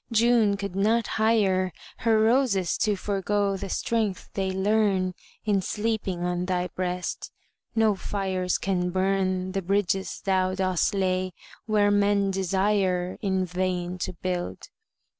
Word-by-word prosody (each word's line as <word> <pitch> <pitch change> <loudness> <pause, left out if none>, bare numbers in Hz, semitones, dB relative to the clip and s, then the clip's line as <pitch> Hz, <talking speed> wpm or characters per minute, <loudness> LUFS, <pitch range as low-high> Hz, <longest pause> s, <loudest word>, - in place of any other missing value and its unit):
June 230 -2 +4
could 200 -2 -5
not 220 +3 +2 0.2
hire 195 -5 +3 0.3
Her 225 -1 +2
roses 220 -5 +2
to 210 -1 +2
forego 200 0 0
the 195 0 -5
strength 215 -4 -1
they 195 -1 -1
learn 190 -1 +1 0.3
In 205 -3 +2
sleeping 210 -4 -2
on 180 0 -1
thy 180 -1 -1
breast. 180 -1 -3 0.4
No 220 -2 +4
fires 190 -2 -1
can 180 -2 -1
burn 185 0 0
The 195 0 -1
bridges 195 0 0
thou 185 -1 +1
dost 185 0 +1
lay 185 -1 0 0.3
where 205 -1 +3
men 200 -1 +2
desire 190 -1 0
In 190 -2 0
vain 180 0 -2
to - - -3
build. 180 0 -4
195 Hz, 130 wpm, -26 LUFS, 185-205 Hz, 0.4 s, June